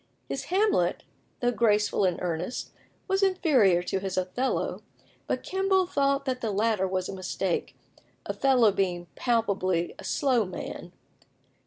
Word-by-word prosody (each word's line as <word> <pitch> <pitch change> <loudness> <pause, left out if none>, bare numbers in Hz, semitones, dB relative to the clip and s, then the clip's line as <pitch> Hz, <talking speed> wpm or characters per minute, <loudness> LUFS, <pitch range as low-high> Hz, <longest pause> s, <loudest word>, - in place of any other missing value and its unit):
His - - -4
Hamlet, 405 +3 +1 0.4
though 245 0 +2
graceful 210 -4 +2
and 180 -2 +1
earnest, 175 +6 -3 0.4
was 385 0 +1
inferior 270 - +3
to 190 - -1
his 190 -1 -4
Othello; 185 +9 -1 0.5
but - - -2
Kemble 380 0 +2
thought 275 -4 +1
that 255 -2 -2
the 225 - -1
latter 210 -1 +1
was 185 -1 -2
a - - -5
mistake, 185 -1 -2 0.5
Othello 250 -6 +3
being 180 -3 -1
palpably 195 -7 0
"a - - -9
slow 255 -5 +2
man." 185 - -7
220 Hz, 135 wpm, -27 LUFS, 185-275 Hz, 0.5 s, inferior